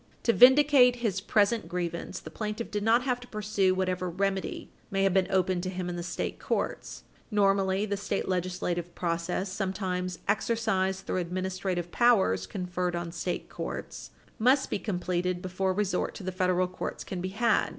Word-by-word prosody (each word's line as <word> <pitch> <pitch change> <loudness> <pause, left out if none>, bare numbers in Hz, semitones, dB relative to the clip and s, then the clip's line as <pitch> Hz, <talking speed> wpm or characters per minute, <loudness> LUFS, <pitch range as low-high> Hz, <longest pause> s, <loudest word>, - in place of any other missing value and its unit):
To 230 - +3
vindicate 260 0 +7
his 220 -6 -1
present 210 +2 +2
grievance, 170 -1 -3
the 155 - -10
plaintiff 215 +4 -4
did 210 - -1
not 230 +3 +4
have 250 -2 0
to 245 - -12
pursue 205 -4 +1
whatever 185 -1 -1
remedy 195 +2 -2 0.2
may 195 0 0
have 195 -2 +3
been 190 -1 +3
open 185 -1 +1
to 185 - -3
him 180 -1 -4
in 175 - -3
the 175 - -4
state 175 0 -4
courts. - - -3 0.3
Normally, 195 -2 +2
the 200 -1 -1
state 200 - -2
legislative 180 -1 -2
process, 175 +2 -2
sometimes 185 -2 -2
exercised 195 -4 0
through - - -1
administrative 180 0 -3
powers 190 - +3
conferred 180 - -2
on 170 -1 -4
state 175 +1 -3
courts, - - -6 0.3
must 260 +4 +3
be - - 0
completed 180 -2 -1
before 185 +1 -1
resort 195 -1 -1
to - - -8
the 185 - -2
federal 185 0 +1
courts 180 - -5
can 180 -2 -5
be 185 - -2
had. 225 +4 +2
190 Hz, 170 wpm, -28 LUFS, 180-210 Hz, 0.3 s, vindicate